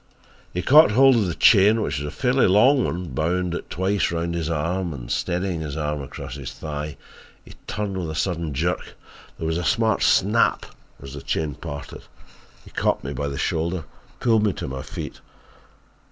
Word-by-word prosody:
"He 90 Hz, -, -3 dB
caught 150 Hz, -, +7 dB
hold 135 Hz, +2 st, +6 dB
of 110 Hz, -5 st, +2 dB
the 85 Hz, -, -3 dB
chain, 105 Hz, +1 st, +6 dB
which 80 Hz, -9 st, -1 dB
was 75 Hz, -, -4 dB
a -, -, -3 dB
fairly 130 Hz, -, +2 dB
long 125 Hz, +8 st, +5 dB
one, 90 Hz, 0 st, -3 dB
bound 85 Hz, +5 st, -1 dB
it -, -, -5 dB
twice 95 Hz, +1 st, 0 dB
round 85 Hz, 0 st, -2 dB
his 85 Hz, -2 st, -2 dB
arm 85 Hz, +1 st, -1 dB
and -, -, -8 dB
steadying 90 Hz, -1 st, -1 dB
his 75 Hz, -2 st, -5 dB
arm 75 Hz, -1 st, -2 dB
across 70 Hz, -, -8 dB
his -, -, -6 dB
thigh, 75 Hz, -1 st, -6 dB, 0.5 s
he -, -, -13 dB
turned 105 Hz, -2 st, -3 dB
with 85 Hz, -3 st, -3 dB
a 80 Hz, -, -5 dB
sudden 85 Hz, -1 st, -1 dB
jerk. 85 Hz, +6 st, -2 dB, 0.4 s
There -, -, -5 dB
was 80 Hz, +1 st, 0 dB
a -, -, -3 dB
smart 110 Hz, +4 st, +1 dB
'snap' -, -, +3 dB, 0.4 s
as 70 Hz, 0 st, -8 dB
the 70 Hz, -, -7 dB
chain 75 Hz, 0 st, -2 dB
parted. 70 Hz, 0 st, -8 dB, 0.6 s
He -, -, -14 dB
caught -, -, 0 dB
me 70 Hz, -, -4 dB
by 70 Hz, +2 st, -3 dB
the 70 Hz, -1 st, -4 dB
shoulder 85 Hz, +2 st, -1 dB, 0.3 s
and -, -, -30 dB
pulled 115 Hz, -3 st, +3 dB
me 105 Hz, -3 st, +2 dB
to -, -, -5 dB
my 65 Hz, 0 st, -5 dB
feet. -, -, -7 dB
85 Hz, 195 wpm, -23 LUFS, 75-100 Hz, 0.6 s, caught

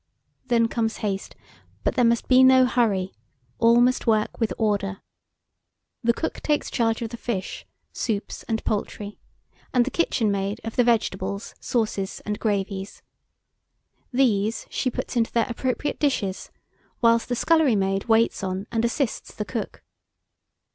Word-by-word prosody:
Then 230 Hz, -2 st, +3 dB
comes 225 Hz, -1 st, -1 dB
haste; 195 Hz, -1 st, -3 dB, 0.5 s
but -, -, +1 dB
there 250 Hz, -, +2 dB
must 235 Hz, 0 st, +2 dB
be 255 Hz, 0 st, +6 dB
no 260 Hz, 0 st, +7 dB
hurry, 210 Hz, -7 st, +1 dB, 0.5 s
all 235 Hz, +1 st, +5 dB
must 250 Hz, +1 st, +2 dB
work 215 Hz, -1 st, +1 dB
with 225 Hz, -2 st, 0 dB
order. 200 Hz, -3 st, 0 dB, 1.0 s
The 235 Hz, -, +4 dB
cook 320 Hz, -, -4 dB
takes 295 Hz, -1 st, 0 dB
charge 225 Hz, -1 st, +1 dB
of 225 Hz, -, -3 dB
the 235 Hz, -, -6 dB
fish, 200 Hz, -6 st, -4 dB, 0.3 s
soups, 215 Hz, -3 st, -3 dB
and 220 Hz, -1 st, -2 dB
poultry; 210 Hz, 0 st, -3 dB, 0.5 s
and 245 Hz, -2 st, +3 dB
the 270 Hz, -, -3 dB
kitchen 235 Hz, -10 st, +1 dB
maid 200 Hz, +2 st, -2 dB
of 225 Hz, -, -5 dB
the 245 Hz, -, +4 dB
vegetables, 200 Hz, -4 st, 0 dB
sauces, 215 Hz, -5 st, -2 dB
and 210 Hz, 0 st, -3 dB
gravies. 200 Hz, -2 st, -2 dB, 1.1 s
These 225 Hz, -4 st, +1 dB
she 255 Hz, -, 0 dB
puts 250 Hz, -, -5 dB
into 230 Hz, -2 st, +1 dB
their 230 Hz, -1 st, +2 dB
appropriate 255 Hz, +4 st, -2 dB
dishes, 210 Hz, -10 st, -1 dB, 0.5 s
whilst 230 Hz, 0 st, +3 dB
the 245 Hz, -, 0 dB
scullery 315 Hz, -2 st, +3 dB
maid 195 Hz, 0 st, 0 dB
waits 225 Hz, -2 st, +2 dB
on 190 Hz, +1 st, -3 dB
and 225 Hz, -1 st, 0 dB
assists 240 Hz, +2 st, -2 dB
the -, -, -3 dB
cook. -, -, -5 dB
225 Hz, 150 wpm, -24 LUFS, 200-245 Hz, 1.1 s, no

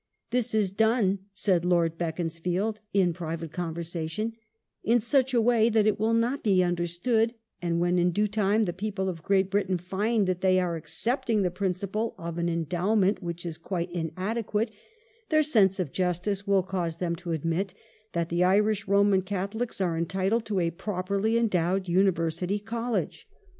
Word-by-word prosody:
"This 245 Hz, -2 st, 0 dB
is 205 Hz, -4 st, +2 dB
done," 215 Hz, -1 st, +2 dB
said 190 Hz, -3 st, +1 dB
Lord 170 Hz, -2 st, +2 dB
Beaconsfield 175 Hz, +5 st, -2 dB
in 185 Hz, -3 st, +3 dB
private 165 Hz, -1 st, -5 dB
convei 170 Hz, -1 st, -3 dB
sation, 170 Hz, +7 st, -3 dB, 0.3 s
" -, -, -54 dB
in 240 Hz, -, +6 dB
such 265 Hz, +3 st, +2 dB
a 245 Hz, -, +3 dB
way 230 Hz, -1 st, +4 dB
that 220 Hz, -2 st, +3 dB
it 215 Hz, -1 st, +2 dB
will 225 Hz, +2 st, +2 dB
not 240 Hz, +5 st, +1 dB
be 190 Hz, -4 st, +3 dB
understood, 175 Hz, +7 st, 0 dB, 0.3 s
and 170 Hz, -1 st, 0 dB
when 175 Hz, +1 st, +2 dB
in 175 Hz, +1 st, +3 dB
due 210 Hz, +5 st, +1 dB
time 210 Hz, +1 st, +2 dB
the 175 Hz, -4 st, -1 dB
people 195 Hz, 0 st, -3 dB
of 170 Hz, -3 st, -4 dB
Great 195 Hz, +1 st, +1 dB
Britain 195 Hz, -2 st, +1 dB
find 200 Hz, +5 st, 0 dB
that 185 Hz, -1 st, -1 dB
they 185 Hz, -1 st, +4 dB
are 175 Hz, -2 st, 0 dB
accepting 215 Hz, -, -1 dB
the 180 Hz, -, 0 dB
principle 195 Hz, +4 st, -2 dB
of 170 Hz, 0 st, -5 dB
an 170 Hz, 0 st, 0 dB
endowment 185 Hz, +5 st, +1 dB
which 170 Hz, -1 st, -5 dB
is 165 Hz, -2 st, -5 dB
quite 175 Hz, 0 st, -3 dB
inadequate, 210 Hz, +6 st, -2 dB, 0.6 s
their 310 Hz, -1 st, +4 dB
sense 205 Hz, -10 st, +3 dB
of 170 Hz, -7 st, -2 dB
justice 185 Hz, +2 st, -1 dB
will 195 Hz, -2 st, +3 dB
cause 175 Hz, -3 st, -3 dB
them 170 Hz, -1 st, -1 dB
to 175 Hz, 0 st, -6 dB
admit 165 Hz, +4 st, -1 dB, 0.4 s
that 170 Hz, -1 st, -1 dB
the 175 Hz, +1 st, +2 dB
Irish 205 Hz, +2 st, +2 dB
Roman 200 Hz, -1 st, +4 dB
Catholics 200 Hz, +5 st, -3 dB
are 175 Hz, -4 st, 0 dB
entitled 190 Hz, +7 st, 0 dB
to 205 Hz, -3 st, -1 dB
a 170 Hz, -1 st, +1 dB
properly 200 Hz, +4 st, -1 dB
endowed 190 Hz, -4 st, +1 dB
University 180 Hz, 0 st, +1 dB
College. 230 Hz, +3 st, -3 dB
190 Hz, 170 wpm, -27 LUFS, 175-215 Hz, 0.6 s, in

